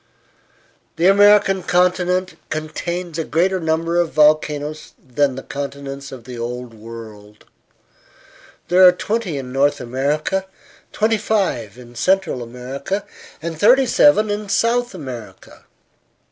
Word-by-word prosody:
The 165 - 0
American 200 0 +5
continent 180 +1 +1 0.2
contains 165 +2 -4
a - - 0
greater 185 +5 +1
number 165 +1 0
of 170 -2 0
volcanoes 150 0 +1
than 130 +1 -1
the 135 - -7
continents 140 -1 -6
of 130 -3 -10
the 120 0 -9
Old 120 0 -5
World. 110 -2 -12 1.2
There 185 +1 +5
are - - +8
twenty 205 -4 -2
in 130 -2 -7
North 140 +2 +2
America, 145 +9 -1 0.4
twenty 220 0 +1
five 185 - -1
in 120 -1 -13
Central 185 +1 0
America, 130 - -5 0.4
and 165 -2 -5
thirty 255 +7 +5
seven 235 -4 +4
in 205 0 -4
South 240 +1 +1
America. 120 - -10
155 Hz, 120 wpm, -19 LUFS, 130-190 Hz, 1.2 s, are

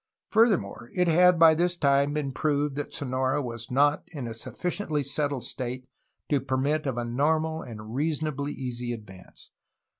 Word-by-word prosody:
Furthermore, 195 - +2
it 180 -1 +2
had 180 +2 +5
by 165 -1 +8
this 175 +2 +1
time 140 -1 +3
been 145 -3 -1
proved 145 0 0
that 145 +1 -4
Sonora 130 +1 -1
was 115 -4 -5
not 145 +3 +3
in 145 -6 -6
a 115 - -4
sufficiently 155 - -2
settled 140 -1 -2
state 125 -1 -5 0.4
to 145 -3 +1
permit 140 +3 0
of 130 -3 -2
a 120 - -1
normal 160 +6 0
and 110 -2 -9
reasonably 150 0 -1
easy 125 -2 -4
advance. 95 -5 -12
140 Hz, 155 wpm, -27 LUFS, 125-155 Hz, 0.4 s, by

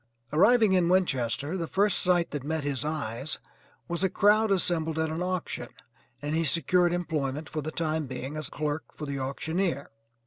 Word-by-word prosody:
Arriving 215 +5 +5
in 180 -2 +3
Winchester 145 -4 +1
the 170 -3 -2
first 200 +2 +2
sight 175 -2 +2
that 145 -3 -4
met 155 +1 -2
his 140 -1 -1
eyes 145 -3 -3 0.5
was 170 +2 -2
a 190 - +3
crowd 210 +4 +4
assembled 165 -4 +2
at 160 0 0
an 160 +2 -3
auction, 180 -1 -2 0.6
and 145 +1 -2
he 165 +1 +2
secured 170 +3 +3
employment 155 -4 -2
for 155 -1 -3
the 155 - -4
time 155 -2 -1
being 130 +3 -5
as 155 -3 -3
clerk 150 +1 -2
for 150 - -4
the 140 -1 -3
auctioneer. 150 +3 -2
160 Hz, 175 wpm, -28 LUFS, 145-180 Hz, 0.6 s, Arriving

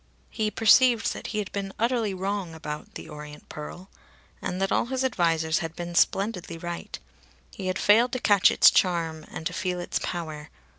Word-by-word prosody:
He 215 -2 -1
perceived 230 +2 +4
that - - -7
he 215 - -4
had 210 -2 -3
been 195 -1 -4
utterly 230 -2 +1
wrong 190 -2 -3
about 150 -1 -7
"The - - -8
Orient 150 -1 -10
Pearl." 165 +5 -8 0.5
And 180 - -3
that 195 0 0
all - - +2
his 260 +1 -1
advisers 165 -9 +1
had 165 0 -5
been 175 0 -6
splendidly 180 -2 +1
right. 175 +1 -6 0.5
He 190 - -6
had 185 0 -1
failed 230 +4 +4
to 255 - -1
catch 205 -5 +5
its - - +6
charm 165 -4 0
and 160 - -7
to 180 - -2
feel 180 -1 -2
its 175 - -2
power. 155 -4 -5
185 Hz, 185 wpm, -26 LUFS, 165-210 Hz, 0.5 s, its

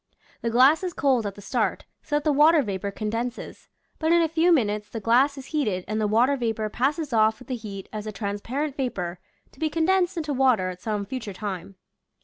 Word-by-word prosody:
The 230 - -1
glass 260 +7 +5
is 360 -2 -2
cold 260 -8 +1
at 200 - -6
the 205 - -12
start, - - -1 0.2
so 295 - -3
that 295 - +1
the 305 - +2
water 300 +2 +5
vapor 200 -2 -3
condenses, 230 +4 -5 0.3
but 320 0 +1
in 340 0 +5
a - - +2
few 325 +2 +2
minutes 210 -8 +1
the 225 - -5
glass 255 +6 +3
is 270 - -8
heated 210 -12 0
and 215 +1 -1
the 210 - +2
water 240 +6 +3
vapor 225 -4 -2
passes 280 +5 -1
off 220 0 +3
v.ith 250 - -15
the 255 - -2
heat 200 -4 -8
as 215 0 -5
a - - -3
transparent 230 +8 -3
vapor 180 -10 -3 0.3
to - - -21
be 315 - 0
condensed 355 +3 +1
into 305 -3 -2
water 250 -8 +3
at 180 0 -8
some 210 -2 -2
future 220 -2 -5
time. 195 -1 -6
240 Hz, 215 wpm, -25 LUFS, 210-295 Hz, 0.3 s, glass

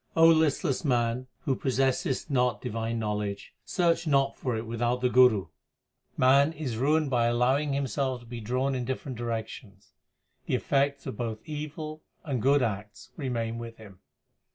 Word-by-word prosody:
listless 160 -3 +4
man 125 -2 0
who 140 - 0
possessest 135 +2 0
not 125 -2 +2
divine 115 -1 -3
knowledge, 105 -2 -3
search 170 -2 +1
not 140 -2 +2
for 125 -4 -2
it 110 - -4
without 120 +2 -1
the 125 0 +1
Guru. 125 -6 +5 0.7
Man 140 +4 +5
is 145 -7 -4
ruined 145 +4 +2
by 120 -2 +3
allowing 130 +5 +2
himself 135 -1 -1
to - - -15
be 120 0 -7
drawn 130 +5 0
in 125 -1 -2
different 130 +1 -4
directions; 110 -3 -6 0.5
the - - +1
effects 140 0 0
of - - -5
both 115 -2 -3
evil 155 +1 -6 0.2
and 135 -6 -2
good 140 +2 +4
acts 105 -2 -5
remain 115 -5 -3
with 115 -1 -8
him. 100 -4 -14
125 Hz, 155 wpm, -28 LUFS, 115-140 Hz, 0.7 s, Guru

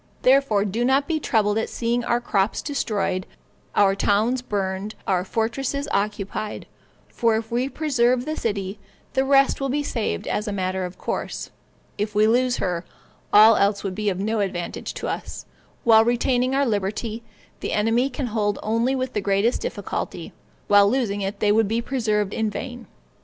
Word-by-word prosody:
Therefore 255 -6 +4
do 215 +4 -1
not 270 +3 +2
be 320 -2 0
troubled 215 -6 +1
at - - -2
seeing 235 +1 -1
our 240 0 +1
crops 205 -4 0
destroyed, 210 -9 -1 0.5
our 195 -1 +5
towns 215 +6 +1
burned, 200 -2 -3
our 180 -2 +1
fortresses 255 +7 -2
occupied; 205 +1 -2 0.4
for 230 -2 +1
if 225 0 -3
we 245 +3 0
preserve 255 -5 +1
the 310 - -2
city, 200 -4 -3 0.3
the 265 - +2
rest 275 0 +3
will 275 - -1
be 290 +3 0
saved 230 -6 -2
as 210 - -2
a - - -1
matter 185 -1 -2
of 180 0 -8
course; - - -4 0.5
if 210 0 -2
we 210 +1 +5
lose 245 +3 +2
her, 175 -2 -2 0.5
all 215 +2 +8
else 200 0 +2
would 195 -2 -3
be 210 +2 -1
of 185 -1 -3
no 215 +2 -1
advantage 185 -4 -3
to - - -4
us; - - -5 0.4
for - - -3
while 220 0 +8
retaining 245 +2 +1
our 280 +1 +3
liberty, 215 +1 -2 0.4
the - - -4
enemy 225 +5 +2
can 265 +1 -4
hold 210 -3 0
them - - -10
only 230 +5 +1
with 255 -1 -3
the 210 - -1
greatest 200 +4 +1
difficulty, - - -4 0.3
while 205 0 +6
losing 215 -5 0
it 195 +1 -3
they 210 - +4
would 220 0 +3
be 225 +3 0
preserved 215 -5 -1
in 220 -1 0
vain. 245 +2 -7
220 Hz, 180 wpm, -23 LUFS, 205-250 Hz, 0.5 s, all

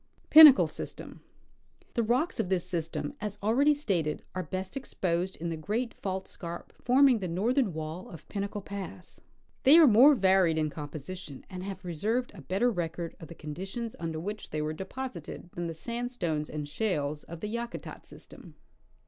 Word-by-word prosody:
Pinnacle 305 -3 +11
System. - - -8 0.7
The 235 - +1
rocks 250 +10 0
of 180 - 0
this 185 -2 +1
system, 165 - -3
as 210 -1 -4
already 275 +8 +4
stated, 175 - -1
are 185 - -2
best 185 - -5
exposed 185 -8 -2
in 170 +1 -4
the 165 - -2
great 220 +9 -2
fault 190 -1 -4
scarp 170 -1 -8
forming 255 -1 +5
the 185 - -3
northern 220 +7 +1
wall 160 +2 -6
of 160 - -12
Pinnacle 200 0 -4
pass. 195 -3 -8 0.4
They 285 +4 +8
are 335 - +9
more 265 +4 +7
varied 190 -6 +3
in 155 -1 0
composition 150 +1 -8
and 185 -1 -6
have 190 0 -6
preserved 210 +9 -1
a 190 - -11
better 195 - +1
record 170 -3 -4
of 165 - -10
the 170 - -10
conditions 190 +10 -6
under 165 -2 -3
which 205 +5 -5
they 155 - -3
were 150 +1 -2
deposited 190 - -7
than 175 0 -3
the 165 - -5
sandstones 235 -8 -3
and 150 -1 -4
shales 150 -4 -2
of 170 -1 -9
the 210 - -3
Yakutat 235 +1 -6
system. - - -13
185 Hz, 170 wpm, -29 LUFS, 165-235 Hz, 0.7 s, Pinnacle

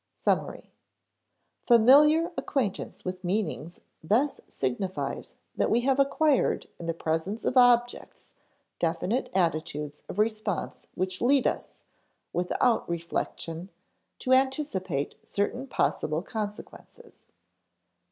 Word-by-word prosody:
[Sidenote: - - +1
Summary] - - -11 1.0
Familiar 290 +8 +6
acquaintance 235 -9 -3
with 185 0 -5
meanings 180 -3 -2 0.2
thus 235 - +1
signifies 140 +9 -3 0.2
that - - +1
we 235 - +3
have 265 +2 +1
acquired 280 0 +2
in 170 - -6
the 165 - 0
presence 165 +7 -2
of - - 0
objects 245 -1 +2 0.5
definite 175 +9 0
attitudes 155 -4 -1
of - - -7
response 215 -2 -1
which 185 0 -2
lead 270 +2 +4
us, - - -3 0.5
without 180 +6 +1
reflection, 170 +1 -4 0.5
to 260 - +1
anticipate 260 - 0
certain 245 +6 -2
possible 155 - 0
consequences. 210 0 -8
205 Hz, 105 wpm, -27 LUFS, 170-255 Hz, 1.0 s, Familiar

